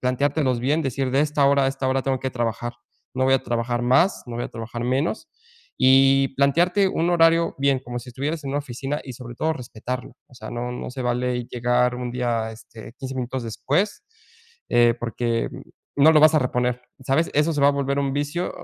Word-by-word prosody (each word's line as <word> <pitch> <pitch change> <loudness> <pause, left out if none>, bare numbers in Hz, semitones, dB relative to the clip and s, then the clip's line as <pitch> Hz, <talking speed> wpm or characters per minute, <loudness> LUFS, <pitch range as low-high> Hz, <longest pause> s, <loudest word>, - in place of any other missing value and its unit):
planteártelos 130 0 0
bien, 145 +6 +1
decir: 135 -1 -2
"De 135 +2 +2
esta 150 -1 +2
hora 140 0 +4
a - - +3
esta 135 0 -3
hora 130 0 +1
tengo 135 0 0
que 130 - -2
trabajar. 120 -1 -3 0.4
No 130 0 +1
voy 135 - +4
a 135 - +1
trabajar 120 +1 -2
más, 130 +10 +3
no 120 -1 -6
voy 120 - -3
a - - -5
trabajar 120 +1 -6
menos", 140 - -1 0.5
y 135 +1 +5
plantearte 175 +8 +3
un 170 -1 0
horario 165 -1 +3
bien, 140 -1 +2
como 120 0 -5
si 120 +1 -10
estuvieras 145 +6 -3
en 135 - -3
una 140 - 0
oficina 140 +2 -4
y 130 - -7
sobre 120 0 -9
todo 160 +6 0
respetarlo. 125 -1 -6
O - - -24
sea, 110 -2 -9
no 120 +1 -4
no 125 - -6
se 130 0 -5
vale 125 0 -1
llegar 125 +1 +1
un 125 0 -4
día, 120 -2 -1
este, 110 +1 -13
15 135 -1 -6
minutos 130 0 -3
después, 175 - -1 0.7
eh, 120 -1 +4
porque 115 0 -2 0.5
no 145 +3 +7
lo 155 - +5
vas 155 +1 +6
a - - +6
reponer, 125 -1 -1 0.3
¿sabes?, 150 +5 +1
eso 150 +3 +2
se 145 - -1
va 140 - +6
a - - +5
volver 140 0 -1
un 135 -1 -1
vicio, 145 +5 -2
130 Hz, 210 wpm, -23 LUFS, 120-140 Hz, 0.7 s, no